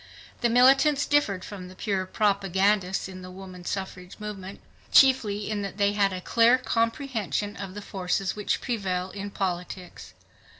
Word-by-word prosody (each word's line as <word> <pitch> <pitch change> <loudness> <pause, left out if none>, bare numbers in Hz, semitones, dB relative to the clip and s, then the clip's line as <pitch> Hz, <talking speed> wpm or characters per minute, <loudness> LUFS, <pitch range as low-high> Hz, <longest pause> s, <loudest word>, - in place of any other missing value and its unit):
The 235 - +2
militants 270 +4 +5
differed 205 -11 +1
from 190 -3 -8
the 185 - -12
pure 190 -1 -2
propagandists 195 -1 +1
in 185 -1 -9
the 185 - -9
woman 185 -1 -10
suffrage 190 -1 -5
movement 200 -2 -7 0.3
chiefly 220 -7 +4
in 210 -1 -2
that 195 -1 -5
they 200 0 +2
had 200 -1 +2
a 185 - -4
clear 235 +5 +4
comprehension 230 - -1
of 195 -2 -7
the 205 - -7
forces 190 -1 -2
which 210 -1 -1
prevail 190 -6 -2
in 200 0 -6
politics. 180 -1 -5
200 Hz, 155 wpm, -26 LUFS, 185-220 Hz, 0.3 s, militants